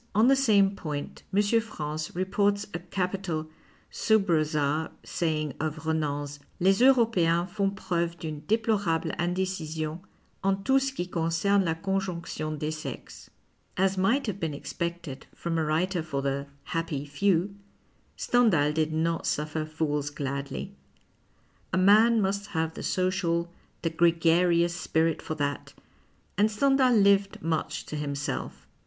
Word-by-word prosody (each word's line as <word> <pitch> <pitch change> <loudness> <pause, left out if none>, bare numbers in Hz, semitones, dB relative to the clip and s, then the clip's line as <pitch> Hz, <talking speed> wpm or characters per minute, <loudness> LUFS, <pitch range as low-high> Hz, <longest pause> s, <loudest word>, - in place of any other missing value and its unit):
On 220 +3 +5
the 270 - +6
same 205 -7 +4
point, 150 -6 -5
M. 205 +2 +3 0.2
France 155 -8 -5
reports 200 +2 +1
a 175 - -3
capital 180 -3 -3 0.4
sub 220 -3 +2
rosd 155 -2 +1 0.2
saying 155 -4 -1
of 155 0 -3
Renan's: 145 -2 -2
— - - -35
" - - -34
Les 190 +3 +4
Europeens 220 -10 +4
font 200 -1 0
preuve 170 -3 -2
d'unc 155 -3 -7
deplorable 210 -7 +1
ind6cision 170 -3 -2 0.4
en 195 0 +1
tout 270 +3 +4
ce 270 0 -1
qui 180 -10 -3
concerne 175 +4 +1
la 165 -1 0
conjonotion 170 -4 -3
dcs 150 +1 -2
sexes." 155 - -8 0.5
As 190 +1 +2
might 225 +9 +2
have 205 -4 -3
been 160 -5 -2
expected 170 -2 -5
from 165 -1 -2
a - - +1
wTiter 165 +3 0
for 140 -4 -3
the 140 0 -2
" 140 - -36
happy 165 -4 -2
few," 180 +5 +1 0.6
Stendhal 195 -12 +3
did 155 0 0
not 165 +1 0
suffer 155 +1 -1
fools 150 -2 -1
gladly. 140 +5 -4 1.0
A 185 - +1
man 215 +5 +6
must 200 +1 -1
have 160 -2 -2
the - - -7
social, 175 -2 0 0.3
tiic 165 -1 -2
gregarious 170 0 +3
spirit 165 -2 0
for 155 - -4
that, 145 -2 -3 0.6
and 210 +1 +5
Stendhal 265 +3 +3
lived 200 -3 +3
much 160 -1 -2
to - - -6
himself. 145 -1 -4
170 Hz, 140 wpm, -27 LUFS, 155-195 Hz, 1.0 s, the